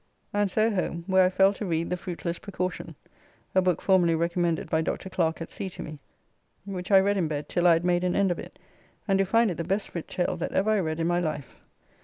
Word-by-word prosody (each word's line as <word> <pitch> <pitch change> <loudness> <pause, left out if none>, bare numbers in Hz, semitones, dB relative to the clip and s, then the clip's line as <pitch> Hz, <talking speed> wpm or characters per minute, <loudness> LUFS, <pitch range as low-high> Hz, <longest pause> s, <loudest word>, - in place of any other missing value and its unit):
And 205 -1 +1
so 215 +4 +2
home, 175 -4 -2
where 190 0 +4
I - - +1
fell 195 +1 +4
to 210 - -6
read 170 -3 -1
"The - - +2
Fruitless 175 -2 -5
Precaution" 185 -4 -4 0.6
(a 190 - +4
book 180 -3 0
formerly 180 -4 +4
recommended 170 0 0
by 160 - +1
Dr. 175 +3 -3
Clerke 165 -2 0
at - - -11
sea 195 - -4
to - - -8
me), 155 -1 -8 0.7
which 185 -2 -6
I 195 -2 +7
read 200 +1 +2
in 175 -4 +1
bed 150 -1 -4
till 175 0 +2
I 170 - +7
had 165 +1 0
made 175 0 +2
an 180 -1 0
end 200 -2 +3
of 175 - -2
it, - - -10 0.5
and 195 -1 +2
do 195 - +3
find 225 +2 +3
it 170 - -5
the 170 - -2
best 195 +4 -2
writ 170 - -5
tale 180 0 -1
that 175 - -4
ever 205 +3 +2
I 215 - +3
read 160 -3 -2
in 165 - 0
my 175 +1 +2
life. 155 -5 -3
180 Hz, 250 wpm, -27 LUFS, 170-195 Hz, 0.7 s, I